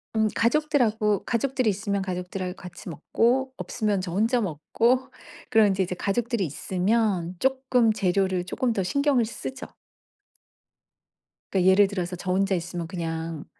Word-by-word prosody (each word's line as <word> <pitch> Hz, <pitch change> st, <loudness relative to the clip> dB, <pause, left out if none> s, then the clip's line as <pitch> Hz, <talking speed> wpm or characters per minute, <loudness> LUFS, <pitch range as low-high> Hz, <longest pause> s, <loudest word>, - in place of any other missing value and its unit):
음 220 Hz, 0 st, +3 dB
가족들하고 230 Hz, -6 st, +1 dB
가족들이 255 Hz, 0 st, 0 dB
있으면 200 Hz, 0 st, -1 dB
가족들하고 180 Hz, 0 st, -4 dB
같이 180 Hz, -1 st, -10 dB
먹고 245 Hz, -, +1 dB
없으면 210 Hz, -5 st, -1 dB
저 180 Hz, -2 st, -5 dB
혼자 225 Hz, +5 st, +2 dB
먹고 230 Hz, -, 0 dB, 0.4 s
그럼 220 Hz, -1 st, +5 dB
이제 195 Hz, -1 st, +1 dB
이제 180 Hz, 0 st, -4 dB
가족들이 225 Hz, +2 st, -1 dB
있으면 185 Hz, +2 st, 0 dB
쪼끔 260 Hz, -2 st, +2 dB
재료를 190 Hz, -2 st, 0 dB
쪼금 240 Hz, +5 st, -1 dB
더 195 Hz, -, -1 dB
신경을 275 Hz, +4 st, +2 dB
쓰죠. 255 Hz, +4 st, -7 dB, 1.9 s
그러니까 190 Hz, -1 st, +4 dB
예를 200 Hz, +1 st, +5 dB
들어서 185 Hz, -2 st, -3 dB
저 180 Hz, +1 st, -4 dB
혼자 195 Hz, +1 st, +2 dB
있으면 175 Hz, -1 st, -4 dB
그냥 165 Hz, -3 st, -4 dB
200 Hz, 320 characters per minute, -25 LUFS, 180-235 Hz, 1.9 s, 그럼